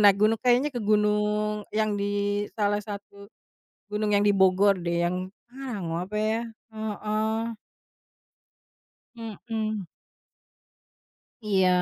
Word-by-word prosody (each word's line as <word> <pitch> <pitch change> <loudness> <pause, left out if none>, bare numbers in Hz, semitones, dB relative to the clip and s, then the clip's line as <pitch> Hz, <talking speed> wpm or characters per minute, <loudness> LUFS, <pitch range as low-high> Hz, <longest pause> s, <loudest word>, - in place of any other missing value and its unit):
naik 200 -2 +7
gunung, 220 +1 +4
kayaknya 250 +4 +4
ke 245 - -3
gunung 210 0 +1
yang 215 0 +1
di 205 0 0 0.4
salah 205 -1 +2
satu 200 -1 -9 0.6
gunung 210 0 0
yang 205 - +5
di 205 - +5
Bogor 190 +1 +5
deh 170 -1 0
yang, 175 +1 0 0.3
ah, 260 -3 -6
gunung 165 0 -2
apa 210 +3 -4
ya? 220 +1 +1 0.3
Heeh. 220 +1 -2 1.6
Mhm. 220 -3 -4 1.6
Iya, 190 -3 +4
210 Hz, 110 wpm, -27 LUFS, 200-220 Hz, 1.6 s, naik